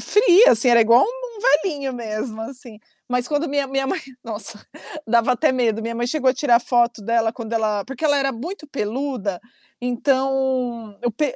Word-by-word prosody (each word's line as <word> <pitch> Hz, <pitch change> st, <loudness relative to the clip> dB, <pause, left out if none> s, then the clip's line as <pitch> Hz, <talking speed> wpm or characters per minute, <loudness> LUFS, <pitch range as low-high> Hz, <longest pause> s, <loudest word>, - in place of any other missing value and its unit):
fria 420 Hz, -, +5 dB
assim, 230 Hz, +3 st, +3 dB
era 235 Hz, -1 st, +6 dB
igual 230 Hz, +3 st, +6 dB
um -, -, -6 dB, 0.3 s
velhinho 285 Hz, -7 st, -3 dB
mesmo, 220 Hz, -1 st, -5 dB
assim. 240 Hz, -2 st, -10 dB, 0.3 s
Mas 250 Hz, 0 st, 0 dB
quando 300 Hz, +2 st, -1 dB
minha 285 Hz, -1 st, 0 dB
minha 270 Hz, 0 st, -1 dB
mãe -, -, -1 dB, 0.2 s
nossa, 220 Hz, -1 st, -6 dB, 0.5 s
dava 235 Hz, +2 st, +3 dB
até 285 Hz, +4 st, +2 dB
medo, 230 Hz, -4 st, 0 dB
minha 230 Hz, +1 st, -4 dB
mãe 240 Hz, -, -1 dB
chegou 265 Hz, 0 st, +1 dB
a -, -, +2 dB
tirar 245 Hz, -3 st, +3 dB
foto 240 Hz, -2 st, +1 dB
dela 225 Hz, +1 st, +1 dB
quando 230 Hz, -1 st, -7 dB
ela 215 Hz, -2 st, 0 dB
porque 270 Hz, +3 st, -8 dB
ela 290 Hz, -1 st, +3 dB
era 275 Hz, -1 st, 0 dB
muito 300 Hz, -, -7 dB
peluda, 235 Hz, -5 st, -3 dB, 0.4 s
então, 255 Hz, -3 st, -1 dB
eu 240 Hz, -, 0 dB
per 270 Hz, +4 st, -2 dB
245 Hz, 180 wpm, -21 LUFS, 230-275 Hz, 0.5 s, era